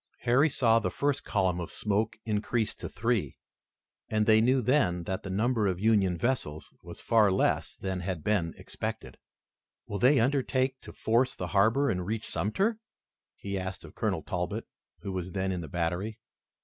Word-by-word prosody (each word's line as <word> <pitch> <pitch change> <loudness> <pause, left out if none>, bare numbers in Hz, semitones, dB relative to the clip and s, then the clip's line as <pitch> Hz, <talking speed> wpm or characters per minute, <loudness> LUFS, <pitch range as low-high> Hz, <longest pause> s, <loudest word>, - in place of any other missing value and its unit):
Harry 130 +6 +4
saw 115 -5 +3
the 110 - -1
first 145 -1 -1
column 95 -3 0
of 85 - -4
smoke 105 +1 -1
increase 110 +1 0
to - - -7
three, 110 - -1 0.7
and 110 -1 +1
they 110 0 +6
knew 130 +3 +4
then 110 -9 +2
that 95 +2 -3
the 95 - -7
number 110 +2 +1
of 95 -2 0
the 95 - -8
Union 100 -5 +3
vessels 85 - -2
was - - -9
far 110 -3 +4
less 95 - +1
than 95 -1 -3
had 90 -3 -4
been 95 -6 0
expected. - - -6 0.7
"Will 100 - -4
they 130 +2 +5
undertake 130 +1 +1
to - - -10
force 120 +3 +1
the 90 - -5
harbor 110 +9 +3
and 90 -8 0
reach 110 +4 -3
Sumter?" 190 - 0 0.6
he 100 -1 -4
asked 95 0 -5
of - - -12
Colonel - - -1
Talbot, - - -3 0.4
who 100 - -4
was 90 -1 -4
then 95 -1 -1
in 90 -2 -2
the 80 - -7
battery. 90 +5 -2
105 Hz, 175 wpm, -29 LUFS, 95-120 Hz, 0.7 s, they